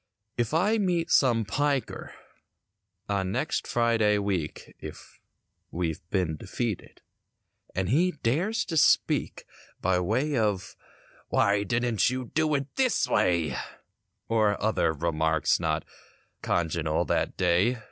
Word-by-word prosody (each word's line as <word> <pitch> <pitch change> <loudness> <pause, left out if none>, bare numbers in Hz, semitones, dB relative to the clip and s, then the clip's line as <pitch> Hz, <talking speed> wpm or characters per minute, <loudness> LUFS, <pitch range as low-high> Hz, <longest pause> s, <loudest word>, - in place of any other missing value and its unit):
If 120 -2 -1
I 200 +8 +2
meet 175 -4 0
some 120 -5 +4
"piker" 140 +5 -2 0.9
on 95 -2 -1
next - - -1
Friday 115 -3 +2
week, 95 -6 -3
(If - - -11 0.5
we've 85 -2 -3
been 90 -6 0
defeated) 115 +4 -4 0.7
and 95 0 0
he 175 +9 +3
dares 175 - +1
to 165 -4 -3
speak - - +2 0.3
By 90 0 +1
way 130 +11 0
of 105 -6 -1 0.5
"why 100 0 +2
didn't 115 +1 +1
you 125 -1 -4
do 155 -1 +2
it 140 0 -4
this 260 -3 +2
way" 85 -7 +1 0.7
Or 110 -3 +2
other 110 -5 +1
remarks 80 0 +1
not 80 -2 -1 0.6
congenial 80 -2 0
that - - -1
day. 95 +8 +2
105 Hz, 115 wpm, -27 LUFS, 90-135 Hz, 0.9 s, some